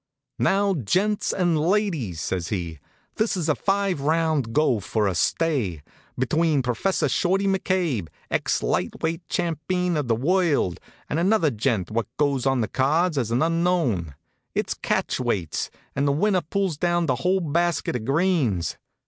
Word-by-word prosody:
"Now 200 0 +2
gents 190 - 0
and 175 -4 +1
ladies," 165 - 0
says 90 -2 -2
he, 85 -6 -4 0.4
"this 215 -2 +1
is 170 -3 -1
a 155 - +4
five 195 -3 0
round 155 -4 +1
go 130 -4 +2
for 105 +1 0
a 95 - 0
stay, 110 - 0 0.3
between 150 +2 +1
Professor 150 +7 0
Shorty 190 +7 +1
McCabe, 185 - 0 0.2
ex - - 0
light - - -1
weight 165 +1 -1
champeen 175 +1 -1
of 150 -4 -1
the 115 - +2
world, 150 - +1 0.3
and 155 - -1
another 185 -4 +3
gent 110 -5 -1
what 115 +1 -1
goes 140 -3 +1
on 135 -2 +2
the 110 - 0
cards 155 - +1
as 125 -6 0
an 120 +5 +2
unknown. 165 - 0 0.4
It's - - 0
catch - - -1
weights, 100 -11 -1 0.3
an' 140 +1 +1
the 140 - +3
winner 185 +6 +2
pulls 190 -2 -1
down 175 -1 +1
the 130 -5 0
whole 185 +5 +1
basket 170 -2 0
of 120 - -3
greens. 140 - +1
155 Hz, 155 wpm, -24 LUFS, 120-180 Hz, 0.4 s, a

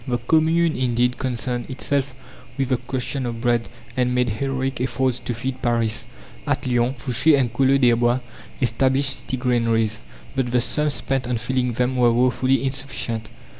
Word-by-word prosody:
The 120 -1 0
Commune 160 +6 +2
indeed 125 -1 0
concerned 125 -1 -3
itself 135 0 -1 0.4
with 135 -2 -1
the 130 - +2
question 130 +1 -3
of 115 -1 -4
bread, 120 -2 +1 0.3
and 125 -1 +1
made 125 -1 +2
heroic 130 +3 -2
efforts 130 0 0
to 120 - -4
feed 130 +3 -4
Paris. 115 -3 0 0.4
At - - 0
Lyons, 125 0 0
Fouché 140 +4 +4
and 120 -3 0
Collot 135 +1 +3
d'Herbois 120 0 +3 0.4
established 130 +3 +2
city 130 +1 -4
granaries, 115 - +1 0.3
but 130 -2 0
the 125 +1 +2
sums 150 +3 +1
spent 125 +2 -2
on 125 -1 0
filling 125 +1 -1
them 125 +2 0
were 120 -1 +5
woefully 130 +2 +2
insufficient. 130 -5 -3
125 Hz, 160 wpm, -22 LUFS, 120-135 Hz, 0.4 s, were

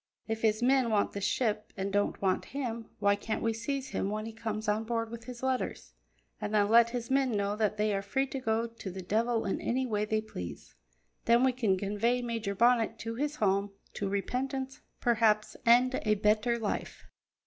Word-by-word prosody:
If 225 0 -2
his 220 +1 +2
men 260 -1 +4
want 210 -2 +1
his 200 - -4
ship 215 -1 0
and 195 +1 -2
don't 205 0 +1
want 185 -1 +1
him, 235 -4 -3
why 200 -1 +3
can't 215 +2 -3
we 225 0 +1
seize 265 +4 -3
him 195 - -1
when 215 +1 -3
he 225 - -7
comes 220 -1 -4
on 210 +1 +1
board 230 0 -2
with 230 -1 -8
his 250 0 -9
letters, 260 - -2 0.5
and - - -3
then 205 -1 +3
let 235 +1 +6
his 240 0 -4
men 265 -2 +2
know 200 0 0
that 215 -1 0
they 210 0 +1
are 195 - 0
free 265 +8 0
to 270 0 -5
go 225 -2 0
to 230 -4 -8
the 190 0 -7
devil 225 +4 +1
in 195 - -1
any 260 +2 0
way 210 -3 0
they 215 +1 0
please? 90 - -8 0.5
Then 235 +2 +5
we 260 - +5
can 225 -7 +1
convey 210 +5 0
Major 225 -4 -2
Bonnet 230 0 +3
to 230 0 -5
his 295 +5 -2
home, 200 -3 +1 0.2
to 200 - -2
repentance, 265 +6 -2 0.2
perhaps, 220 -3 +2
and 250 +2 +6
a 215 -1 +2
better 215 +3 +2
life." 220 -3 -4
225 Hz, 205 wpm, -30 LUFS, 210-240 Hz, 0.5 s, let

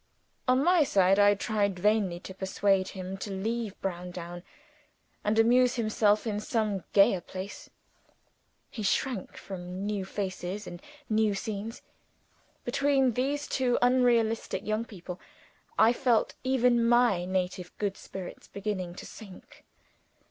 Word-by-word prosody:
On 255 +2 +4
my 350 -1 +5
side, 195 -6 +3
I 205 0 +6
tried 200 -2 0
vainly 200 -2 +1
to 190 - -8
persuade 190 0 +1
him 185 +1 -5
to 195 - -6
leave 215 +2 -3
Browndown 175 -1 -5 0.8
and 210 +1 +1
amuse 245 +3 +5
himself 215 -2 +2
in 210 -2 -1
some 210 -3 -1
gayer 195 -2 +5
place. 190 +3 -8 1.0
He 225 - -6
shrank 215 +1 -1
from 185 0 -6
new 205 -2 -1
faces 190 0 -4
and 175 0 -8 0.3
new 215 -2 +2
scenes. 220 +2 -5 0.8
Between 270 +1 +2
these 280 +5 -1
two 250 -2 +1
unelastic 235 -5 +2
young 215 +2 -1
people, 180 -4 -9 0.6
I 225 +2 +6
felt 240 -2 +2
even 250 -2 +3
my 235 -6 +4
native 180 -1 -2
good 200 -2 -1
spirits 190 -3 -9
beginning 190 -4 -4
to - - -9
sink. 200 -5 -13
210 Hz, 125 wpm, -29 LUFS, 190-235 Hz, 1.0 s, I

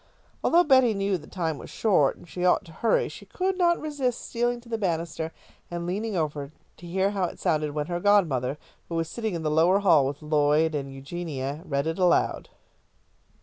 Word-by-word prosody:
Although 345 +1 +5
Betty 260 -7 +4
knew 195 0 0
the 150 - -14
time 165 -5 -3
was - - -10
short 185 -11 +2
and - - -16
she 180 +2 -5
ought 180 +2 +3
to 165 - -13
hurry, 225 +8 +1
she - - -11
could 380 +1 -1
not 345 -2 +3
resist 280 -6 -2
stealing 240 0 0
to 235 - -19
the 225 -1 -3
banister 165 -4 -2 0.4
and 175 0 -4
leaning 205 +4 -2
over 150 -3 -2 0.3
to 175 - -11
hear 190 +3 +1
how 195 -3 0
it - - -6
sounded 150 -1 0
when 150 -1 -1
her 175 +2 -3
godmother, 160 -10 +2 0.3
who 170 - -3
was 165 -1 0
sitting 220 -2 -3
in 165 - -4
the 155 - 0
lower 175 +6 +4
hall 160 -9 +5
with 145 +2 -6
Lloyd 150 +1 +2
and 140 -2 -3
Eugenia, 140 0 -5
read 140 -2 -1
it 160 +3 -2
aloud. 180 -1 +2
175 Hz, 200 wpm, -26 LUFS, 150-205 Hz, 0.4 s, Although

